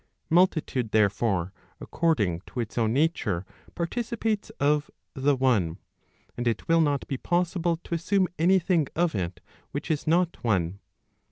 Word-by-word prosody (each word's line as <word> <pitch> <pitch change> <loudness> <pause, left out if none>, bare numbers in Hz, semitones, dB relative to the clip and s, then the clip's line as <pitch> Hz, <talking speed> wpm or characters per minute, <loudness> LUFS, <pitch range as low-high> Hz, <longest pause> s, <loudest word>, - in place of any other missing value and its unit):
Multitude, 155 - +2
there¬ 105 -2 +5
fore, 95 -4 -1 0.3
according 105 - 0
to 125 - -6
its 115 -3 -3
own 115 -2 +1
nature, 120 - 0 0.3
participates 220 +3 -2
of 150 +1 +2 0.2
the 140 +1 +2
one, 115 -11 +1 0.6
and 120 0 -2
it 115 - -1
will 165 0 +4
not 145 -3 0
be 135 - -2
possible 175 +1 0
to - - -6
assume 185 +3 +2
any 185 +4 +5
thing 170 -4 +1
of 175 0 +1
it 90 -3 -3 0.3
which 145 +4 -4
is 155 -1 -2
not 170 +2 +1
one. 95 -5 0
145 Hz, 150 wpm, -27 LUFS, 110-170 Hz, 0.6 s, there¬